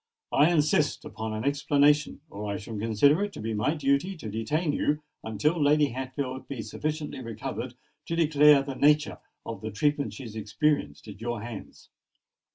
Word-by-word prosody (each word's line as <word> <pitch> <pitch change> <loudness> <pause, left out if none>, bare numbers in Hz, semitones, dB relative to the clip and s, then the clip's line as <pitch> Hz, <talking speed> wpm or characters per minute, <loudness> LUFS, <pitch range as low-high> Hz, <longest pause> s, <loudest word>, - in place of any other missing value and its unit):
I 150 +4 +5
insist 150 -2 +2
upon 110 -1 -5
an 110 - -3
explanation; 145 +1 +2
or 105 +1 -5
I 100 - -2
shall 110 +3 -8
consider 115 - +3
it 205 - -3
to - - -9
be 110 +1 -3
my 110 +9 0
duty 145 +6 0
to 110 -9 -7
detain 150 - -1
you 150 +1 0 0.2
until 150 - 0
Lady 145 0 +4
Hatfield 130 +1 -5
be 130 -6 -5
sufficiently 150 +5 -4
recovered 120 +1 -5 0.3
to 165 - -1
declare 150 -3 +5
the 135 0 -5
nature 150 +2 +3 0.3
of - - -6
the - - -4
treatment 145 +7 0
she 135 - -8
has 110 -3 -9
experienced 115 +7 -1
at 100 0 -10
your 120 -2 -3
hands. 115 -4 -9
140 Hz, 170 wpm, -27 LUFS, 110-150 Hz, 0.3 s, I